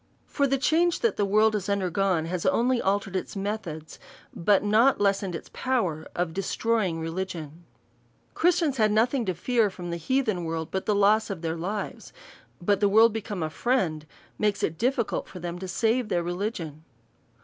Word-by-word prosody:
For 280 Hz, -1 st, 0 dB
the 275 Hz, 0 st, +1 dB
change 335 Hz, +5 st, +2 dB
that 460 Hz, -, +2 dB
the 205 Hz, -, +1 dB
world 215 Hz, +2 st, +3 dB
has 205 Hz, -1 st, -2 dB
undergone, 190 Hz, -3 st, +1 dB
has 175 Hz, +1 st, -3 dB
only 250 Hz, -2 st, +2 dB
altered 195 Hz, 0 st, -1 dB
its 185 Hz, -, -3 dB
methods, 195 Hz, -6 st, -5 dB, 0.4 s
but 200 Hz, +4 st, +3 dB
not 220 Hz, +6 st, +4 dB
lessened 195 Hz, -3 st, +1 dB
its -, -, -8 dB
pov/ 255 Hz, -9 st, 0 dB
er 155 Hz, +1 st, -9 dB
of 175 Hz, -2 st, -1 dB
destroying 195 Hz, -2 st, 0 dB
religion. 165 Hz, -1 st, -5 dB, 0.7 s
Christians 330 Hz, -5 st, +2 dB
had 215 Hz, -2 st, +3 dB
nothing 235 Hz, +3 st, +2 dB
to 185 Hz, -2 st, -1 dB
fear 225 Hz, +4 st, +1 dB
from 175 Hz, -2 st, -7 dB
the 170 Hz, -, -2 dB
heathen 215 Hz, -1 st, 0 dB
world, 160 Hz, -1 st, -3 dB
but 190 Hz, -, -3 dB
the 210 Hz, -, +2 dB
loss 210 Hz, +2 st, +3 dB
of 185 Hz, -4 st, -5 dB
their 165 Hz, 0 st, -1 dB
lives; 195 Hz, +5 st, -5 dB, 0.5 s
but 200 Hz, +2 st, +1 dB
the 205 Hz, -, +3 dB
world 220 Hz, +2 st, +6 dB
be 225 Hz, -, -2 dB
come 200 Hz, -5 st, -4 dB
a 155 Hz, -, -2 dB
friend, 165 Hz, -10 st, 0 dB, 0.3 s
makds 205 Hz, -1 st, 0 dB
it 160 Hz, 0 st, -1 dB
difficult 245 Hz, -2 st, 0 dB
for -, -, -10 dB
them 175 Hz, 0 st, -5 dB
to 190 Hz, -, -6 dB
save 230 Hz, +4 st, 0 dB
their 175 Hz, -1 st, 0 dB
religion. 175 Hz, -4 st, -4 dB
200 Hz, 180 wpm, -26 LUFS, 175-225 Hz, 0.7 s, world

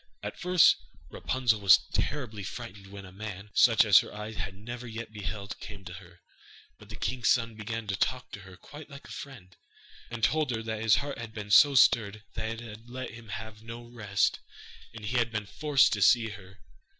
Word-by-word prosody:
At -, -, -6 dB
first 180 Hz, -2 st, +5 dB, 0.3 s
Rapunzel 120 Hz, -5 st, 0 dB
was 100 Hz, -2 st, +8 dB, 0.2 s
terribly 105 Hz, -1 st, -2 dB
frightened 95 Hz, +1 st, -8 dB
when 100 Hz, 0 st, -10 dB
a 90 Hz, -, -12 dB
man, 100 Hz, +1 st, -8 dB
such 115 Hz, -3 st, +5 dB
as 100 Hz, -3 st, +8 dB
her -, -, -5 dB
eyes 105 Hz, +1 st, -7 dB
had 100 Hz, -2 st, -5 dB
never 120 Hz, +4 st, -8 dB
yet 115 Hz, -1 st, -7 dB
beheld, 100 Hz, -1 st, -6 dB
came 100 Hz, -3 st, -10 dB
to 90 Hz, -, -8 dB
her; 90 Hz, -1 st, -14 dB, 0.6 s
but -, -, -16 dB
the -, -, -8 dB
king's 125 Hz, -3 st, -1 dB
son 115 Hz, -2 st, +2 dB
began 110 Hz, +1 st, -5 dB
to 100 Hz, -1 st, -2 dB
talk 130 Hz, +6 st, -1 dB
to -, -, -7 dB
her 95 Hz, -1 st, -13 dB
quite 150 Hz, +1 st, -12 dB
like 140 Hz, -1 st, -12 dB
a -, -, -12 dB
friend, 105 Hz, -10 st, -10 dB, 0.5 s
and 120 Hz, -2 st, -7 dB
told 155 Hz, +3 st, +2 dB
her 115 Hz, -2 st, -2 dB
that 110 Hz, -1 st, -4 dB
his 110 Hz, -1 st, +5 dB
heart 140 Hz, 0 st, -3 dB
had 115 Hz, -1 st, -8 dB
been 105 Hz, -1 st, -6 dB
so 145 Hz, +5 st, +7 dB
stirred 110 Hz, -4 st, +4 dB
that 110 Hz, -, -3 dB
it 115 Hz, 0 st, -5 dB
had 115 Hz, 0 st, -11 dB
let 130 Hz, +1 st, -6 dB
him 115 Hz, -2 st, -12 dB
have 110 Hz, 0 st, -7 dB
no 115 Hz, +1 st, -9 dB
rest, 105 Hz, -4 st, -1 dB, 0.5 s
and 110 Hz, 0 st, -9 dB
he 120 Hz, +4 st, -1 dB
had 120 Hz, -1 st, +1 dB
been 110 Hz, -2 st, -3 dB
forced 145 Hz, +5 st, +3 dB
to 105 Hz, -, -2 dB
see 115 Hz, +2 st, +5 dB
her. 100 Hz, -2 st, -12 dB
110 Hz, 210 wpm, -29 LUFS, 100-120 Hz, 0.6 s, was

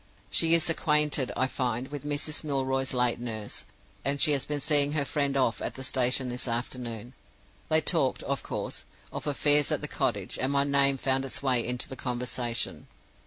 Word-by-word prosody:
"She 165 Hz, 0 st, +4 dB
is 170 Hz, 0 st, +2 dB
acquainted, 150 Hz, -4 st, +2 dB
I 130 Hz, -, +3 dB
find, 125 Hz, -1 st, -2 dB
with 145 Hz, 0 st, -7 dB
Mrs. 150 Hz, +2 st, -1 dB
Milroy's 135 Hz, -2 st, -1 dB
late 125 Hz, -2 st, +1 dB
nurse; 110 Hz, -3 st, -5 dB, 0.4 s
and 140 Hz, +1 st, 0 dB
she 150 Hz, -, +4 dB
has 140 Hz, -2 st, +1 dB
been 150 Hz, -1 st, -2 dB
seeing 145 Hz, 0 st, +3 dB
her 145 Hz, -2 st, +1 dB
friend 140 Hz, -1 st, 0 dB
off 125 Hz, -3 st, +1 dB
at -, -, -3 dB
the 130 Hz, -, -7 dB
station 130 Hz, 0 st, +1 dB
this 125 Hz, +1 st, -4 dB
afternoon. 120 Hz, 0 st, -4 dB, 0.6 s
They 155 Hz, 0 st, +4 dB
talked, 150 Hz, -4 st, +1 dB
of 140 Hz, 0 st, -2 dB
course, -, -, -4 dB, 0.3 s
of -, -, -5 dB
affairs 145 Hz, +1 st, +4 dB
at 150 Hz, -, 0 dB
the 150 Hz, -, -2 dB
cottage, 115 Hz, -10 st, -1 dB
and 130 Hz, +2 st, +1 dB
my 140 Hz, 0 st, +3 dB
name 140 Hz, -1 st, +3 dB
found 135 Hz, 0 st, +1 dB
its 135 Hz, +1 st, -3 dB
way 125 Hz, -3 st, +2 dB
into 125 Hz, 0 st, -2 dB
the 130 Hz, -, -5 dB
conversation. 120 Hz, -2 st, -3 dB
135 Hz, 185 wpm, -28 LUFS, 125-145 Hz, 0.6 s, She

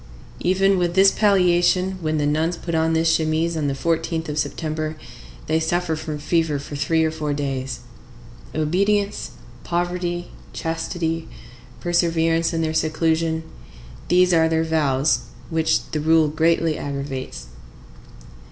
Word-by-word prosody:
Even 190 Hz, +1 st, +2 dB
with 175 Hz, -1 st, 0 dB
this 195 Hz, 0 st, +6 dB
palliation, 185 Hz, -2 st, +3 dB
when 155 Hz, -1 st, 0 dB
the 145 Hz, -, +1 dB
nuns 160 Hz, +4 st, 0 dB
put 170 Hz, -, -5 dB
on 160 Hz, 0 st, +2 dB
this 160 Hz, 0 st, +3 dB
chemise 160 Hz, +1 st, 0 dB
on 155 Hz, -2 st, -1 dB
the 140 Hz, -, -1 dB
14th 165 Hz, +2 st, -1 dB
of 150 Hz, +1 st, -2 dB
September, 155 Hz, +1 st, -3 dB, 0.5 s
they 160 Hz, +1 st, +1 dB
suffer 165 Hz, 0 st, 0 dB
from 155 Hz, -1 st, -5 dB
fever 160 Hz, 0 st, 0 dB
for 140 Hz, +1 st, -7 dB
three 160 Hz, +3 st, +1 dB
or 160 Hz, -, 0 dB
four 150 Hz, -2 st, -3 dB
days. 135 Hz, -3 st, -3 dB, 0.7 s
Obedience, 200 Hz, +6 st, 0 dB, 0.3 s
poverty, 175 Hz, 0 st, -2 dB, 0.2 s
chastity, 165 Hz, 0 st, -3 dB, 0.5 s
perseverance 165 Hz, -1 st, +1 dB
in 165 Hz, -1 st, -1 dB
their 155 Hz, 0 st, -1 dB
seclusion,—these 160 Hz, -, 0 dB
are 160 Hz, -1 st, +4 dB
their 160 Hz, 0 st, +1 dB
vows, 145 Hz, -5 st, +2 dB, 0.3 s
which 160 Hz, 0 st, +1 dB
the 155 Hz, -, -1 dB
rule 160 Hz, 0 st, +4 dB
greatly 160 Hz, 0 st, +1 dB
aggravates. 135 Hz, -, -5 dB
160 Hz, 130 wpm, -22 LUFS, 155-175 Hz, 0.7 s, this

